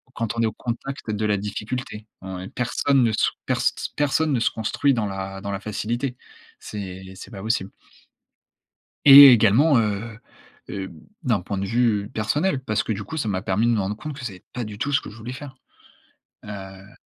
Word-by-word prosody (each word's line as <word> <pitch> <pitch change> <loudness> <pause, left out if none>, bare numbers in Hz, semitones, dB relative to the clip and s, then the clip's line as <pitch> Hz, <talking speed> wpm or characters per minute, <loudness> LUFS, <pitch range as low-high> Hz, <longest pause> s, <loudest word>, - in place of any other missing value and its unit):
quand 115 0 -3
on - - +2
est - - +3
au 110 - -1
contact 120 0 -5
de 105 0 -1
la 105 -1 +2
difficulté. 105 +2 -5 0.2
Ouais, 95 0 -6
personne 130 +2 +1
ne 115 - +2
sou - - +1
pers - - +1
s - - +2 0.2
personne 145 +1 +1
ne 120 - +1
se - - +2
construit 120 +5 +1
dans 110 -3 -1
la 95 0 -5
dans 100 - -4
la 100 - -3
facilité. 120 +5 -3 0.4
C'est 95 -2 -7
c'est 95 - -10
pas 95 -1 -8
possible. 110 -3 -1 1.4
Et 140 0 +13
également, 120 +6 +5
heu 105 +1 -2 0.5
heu, 95 -1 -4
b - - -13 0.3
d'un 115 -7 +2
point 100 +1 -4
de 100 - -2
vue 110 -2 +1
personnel, 140 - 0
parce 110 -2 0
que 110 - -2
du 105 0 -5
coup, 160 - -7
ça 115 - -1
m'a 95 -2 -1
permis 105 +5 +1
de 120 - +3
me 115 - +1
rendre 100 +2 -2
compte 150 +4 -6
que 130 - -7
c'est 95 -6 -7
pas 125 - -3
du 105 -1 -8
tout 145 +5 -2
ce - - +3
que - - -9
je 110 - -13
voulais 120 +3 -7
faire. 135 -1 -9 0.9
Heu 95 -1 -10
110 Hz, 205 wpm, -23 LUFS, 100-125 Hz, 1.4 s, Et